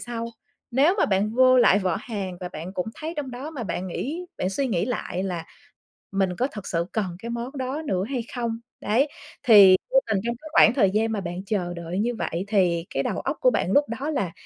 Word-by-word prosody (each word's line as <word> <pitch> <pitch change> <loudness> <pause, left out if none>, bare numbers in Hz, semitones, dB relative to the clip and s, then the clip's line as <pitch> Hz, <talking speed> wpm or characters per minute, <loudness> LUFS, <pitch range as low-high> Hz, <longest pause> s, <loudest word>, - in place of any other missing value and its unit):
sau, 230 -1 -4 0.4
nếu 285 +9 +4
mà - - +4
bạn 210 +3 +1
vô 255 0 +6
lại 200 -4 +6
vỏ 185 -2 0
hàng 200 -6 -5
và 180 - -4
bạn 175 +2 -7
cũng 180 0 -3
thấy 320 +2 -5
trong 275 -3 -3
đó 260 +5 -6
mà 275 -7 -5
bạn 190 -3 -3
nghĩ 315 - -4
bạn 185 - -1
suy 270 +8 0
nghĩ 190 -6 0
lại 215 -6 -3
là 175 -4 -3 0.7
mình 195 -1 +1
có 255 - +1
thực 210 -8 -8
sự 170 0 0
cần 215 -3 0
cái 235 - -7
món 240 +4 -5
đó 265 +4 -3
nữa 185 -6 0
hay 255 -4 -1
không? 230 -2 -2 0.2
Đấy, 245 +8 +2 0.4
thì 200 -5 +9 0.2
vô - - +6
tình 200 - +1
trong 235 0 -1
cái 310 - -9
khoảng 225 - +7
thời 205 -8 +4
gian 220 +2 +1
mà 210 -3 -2
bạn 175 +1 -5
chờ 180 -4 -1
đợi 170 +2 -4
như 240 +2 0
vậy 175 -2 -3
thì 180 -5 +2
cái - - -1
đầu - - -2
óc - - -3
của - - +6
bạn - - 0
lúc 285 +1 +4
đó 290 +3 -2
là 200 - -1
220 Hz, 235 wpm, -25 LUFS, 185-255 Hz, 0.7 s, thì